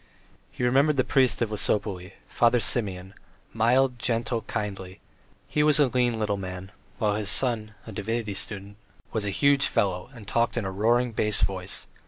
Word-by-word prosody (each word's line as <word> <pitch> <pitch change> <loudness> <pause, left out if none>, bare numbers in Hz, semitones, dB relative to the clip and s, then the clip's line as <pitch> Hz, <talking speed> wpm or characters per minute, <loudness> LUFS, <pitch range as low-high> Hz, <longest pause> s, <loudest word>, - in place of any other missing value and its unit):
He - - -5
remembered 140 +4 +3
the 130 - +4
priest 130 -4 +2
of 110 - -3
Lesopolye, 100 -3 -1
Father 120 +1 +3
Simeon 95 -5 -2 0.4
mild, 125 +3 +2
gentle, 115 0 -1
kindly; 100 -4 -5 0.5
he 150 - 0
was 150 -1 +4
a 145 -3 +4
lean 120 -2 +1
little 105 -2 -1
man, 95 0 -7 0.3
while 105 -3 +1
his 105 -2 -2
son, 110 -2 +1
a 110 - -8
divinity 110 +1 -3
student, 100 +1 -4 0.3
was 110 -2 -2
a - - -1
huge 140 +7 +3
fellow 95 +1 -1
and 115 -6 -13
talked 115 +3 0
in 115 - -1
a 95 - -3
roaring 120 +5 +2
bass 105 -1 0
voice. 95 0 -2
110 Hz, 170 wpm, -26 LUFS, 100-120 Hz, 0.5 s, the